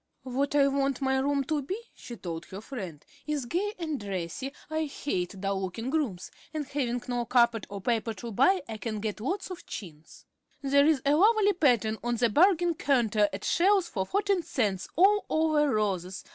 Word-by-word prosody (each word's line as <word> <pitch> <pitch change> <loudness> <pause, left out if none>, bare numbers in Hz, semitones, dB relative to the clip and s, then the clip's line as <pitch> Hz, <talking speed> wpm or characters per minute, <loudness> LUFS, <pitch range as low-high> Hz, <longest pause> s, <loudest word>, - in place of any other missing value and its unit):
"What 270 +3 -1
I 280 -1 +5
want 275 -1 0
my 265 -1 +1
room 280 +1 +1
to 300 +2 -1
be," 375 +10 -4
she 240 - -9
told 170 -3 -6
her 190 - -8
friend, 195 - -7 0.2
"is 295 -4 -1
gay 385 - -1
and 315 -5 -3
dressy. 195 +6 -4 0.2
I 315 0 -1
hate 195 -10 -3
dull 195 0 -1
looking 225 +7 -4
rooms, 225 - -2 0.2
and 300 -2 -2
having 250 -3 -2
no 245 -1 -1
carpet 235 -3 +3
or 200 -1 -6
paper 225 0 -1
to 235 +1 -7
buy 280 - +3
I 220 -1 -5
can 215 0 -4
get 215 0 -3
lots 365 - -3
of 365 - -7
chintz. 160 -6 -10 0.4
There's 280 +1 +4
a 285 - +4
lovely 410 +4 +4
pattern 240 - +2
on 240 0 0
the 235 0 +2
bargain 350 - +4
counter 225 -9 +2
at 195 +1 -6
Shell's 380 0 +3
for 190 -3 -2
fourteen 400 -2 +1
cents, 205 - -1
all 400 +4 +5
over 310 -2 +2
roses. 190 -5 -1
260 Hz, 185 wpm, -28 LUFS, 210-310 Hz, 0.4 s, I